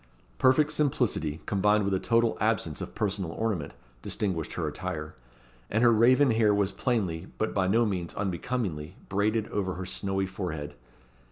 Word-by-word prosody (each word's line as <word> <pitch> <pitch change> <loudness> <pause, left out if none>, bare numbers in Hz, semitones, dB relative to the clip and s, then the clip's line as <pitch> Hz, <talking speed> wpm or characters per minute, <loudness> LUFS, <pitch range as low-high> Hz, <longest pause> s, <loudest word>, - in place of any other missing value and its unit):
Perfect 140 +3 +4
simplicity, 125 - 0
combined 105 +1 +2
with 100 - 0
a 95 - +1
total 115 +1 +2
absence 105 -9 0
of 60 - -7
personal 95 -5 -1
ornament, 100 -10 -2 0.3
distinguished 90 -3 -2
her - - -2
attire; 75 0 -5 0.6
and 115 +3 +1
her 120 - +7
raven 130 +4 +5
hair 110 -2 +3
was 100 -1 +1
plainly, 95 -10 -1
but 110 - -1
by 95 -2 +1
no 115 +5 +3
means 90 -5 -3
unbecomingly, 95 -4 -3
braided 105 +2 +1
over 95 -3 -2
her 95 - -5
snowy 95 +1 -1
forehead. 85 -6 -5
100 Hz, 155 wpm, -28 LUFS, 90-115 Hz, 0.6 s, her